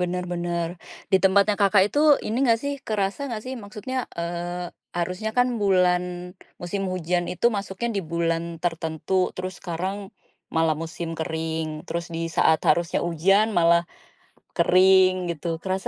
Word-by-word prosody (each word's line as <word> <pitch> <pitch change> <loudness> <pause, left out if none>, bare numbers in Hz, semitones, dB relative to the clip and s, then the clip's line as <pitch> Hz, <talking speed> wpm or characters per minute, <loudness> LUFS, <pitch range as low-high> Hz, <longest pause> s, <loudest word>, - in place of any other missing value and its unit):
benar 180 0 -1
benar. 170 -1 -2 0.4
Di - - +8
tempatnya 200 +2 +4
Kakak 195 -1 +5
itu, 210 +8 -2 0.3
ini 220 - -2
nggak 230 -2 +4
sih, 285 0 -1
kerasa 200 +1 -1
nggak 220 -3 -4
sih 260 - -5
maksudnya, 210 +5 -6 0.2
eee, 175 +1 -4 0.2
harusnya 180 +5 -2
kan 245 - +5
bulan 180 -3 +3 0.6
musim 185 +3 -3
hujan 175 0 -1
itu 180 - +1
masuknya 200 +3 -3
di 195 - +1
bulan 165 0 0 0.2
tertentu, 165 0 -3 0.2
terus 185 0 -4
sekarang 180 +2 -3 0.6
malah 160 -1 +3
musim 165 +1 -5
kering. 160 0 -2 0.2
Terus 170 0 -3
di 165 - -3 0.2
saat 160 -1 +4
harusnya 170 +2 +2
hujan 190 +6 +3
malah 170 0 +5 0.7
kering, 185 0 +5 0.2
gitu. 170 +1 -6 0.2
Kerasa 190 0 -2
180 Hz, 145 wpm, -24 LUFS, 170-195 Hz, 0.7 s, Di